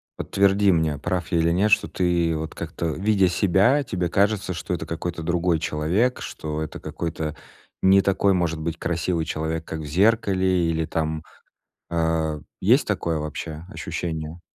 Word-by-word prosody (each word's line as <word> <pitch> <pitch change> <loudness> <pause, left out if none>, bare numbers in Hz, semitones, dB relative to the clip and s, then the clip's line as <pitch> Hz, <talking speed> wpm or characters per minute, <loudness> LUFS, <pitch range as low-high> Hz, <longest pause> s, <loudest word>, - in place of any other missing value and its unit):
подтверди 100 0 +3
мне, 80 -4 +1
прав 90 +1 -2
я 85 - +3
или 85 +1 +3
нет, 100 +5 +2
что - - +4
ты 85 -2 +1
вот 80 0 -5
как-то, - - -5
видя 95 +4 +2
себя, 100 +10 +3
тебе 90 -8 -2
кажется, 100 +1 +1
что 90 +1 -4
это 80 -2 -3
какой-то 85 0 -4
другой 85 0 +1
человек, 85 +12 0
что 75 0 -5
это 80 - -7
какой-то 80 -2 -4 0.5
не 95 +1 +6
такой, 100 +1 +2
может 85 -3 0
быть, 85 +1 -3
красивый 85 -1 -1
человек, 80 +1 -3
как 80 - -5
в - - -6
зеркале 95 0 +2
или 80 0 0
там, 80 -1 -2 0.7
э. 80 -2 0 0.2
Есть - - +4
такое 80 -2 0
вообще 75 +1 -5
ощущение? 80 -1 -4
85 Hz, 155 wpm, -24 LUFS, 80-95 Hz, 0.7 s, не